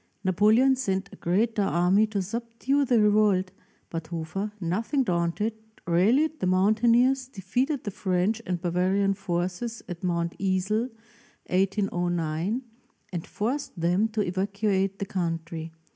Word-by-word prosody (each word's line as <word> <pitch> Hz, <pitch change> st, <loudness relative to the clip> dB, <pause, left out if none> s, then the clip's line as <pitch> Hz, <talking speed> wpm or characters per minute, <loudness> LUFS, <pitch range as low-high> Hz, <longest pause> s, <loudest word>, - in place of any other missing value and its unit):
Napoleon 215 Hz, +8 st, +4 dB
sent 195 Hz, -6 st, -2 dB
a -, -, -11 dB
greater 210 Hz, +5 st, +1 dB
army 195 Hz, +3 st, +3 dB
to 205 Hz, -3 st, -2 dB
subdue 235 Hz, +7 st, -1 dB
the 240 Hz, -3 st, +3 dB
revolt, 205 Hz, -3 st, +3 dB, 0.4 s
but 165 Hz, -1 st, -4 dB
Hofer, 170 Hz, +5 st, -4 dB
nothing 220 Hz, -, 0 dB
daunted, 180 Hz, +3 st, 0 dB, 0.3 s
rallied 240 Hz, -, +3 dB
the 185 Hz, -, 0 dB
mountaineers, 235 Hz, +7 st, +3 dB
defeated 255 Hz, -, -2 dB
the 205 Hz, -, -3 dB
French 190 Hz, +4 st, 0 dB
and 180 Hz, -1 st, -1 dB
Bavarian 185 Hz, +3 st, +1 dB
forces 185 Hz, +4 st, -3 dB
at 175 Hz, -1 st, -7 dB
Mount 170 Hz, -1 st, -1 dB
Isel 195 Hz, +5 st, 0 dB, 0.6 s
(1809) 180 Hz, +1 st, 0 dB, 0.5 s
and 170 Hz, -1 st, -4 dB
forced 240 Hz, -2 st, -3 dB
them 180 Hz, +6 st, +2 dB
to 220 Hz, -1 st, -2 dB
evacuate 195 Hz, +1 st, 0 dB
the 200 Hz, -, -3 dB
country. 165 Hz, -3 st, -3 dB
195 Hz, 125 wpm, -26 LUFS, 180-225 Hz, 0.6 s, Napoleon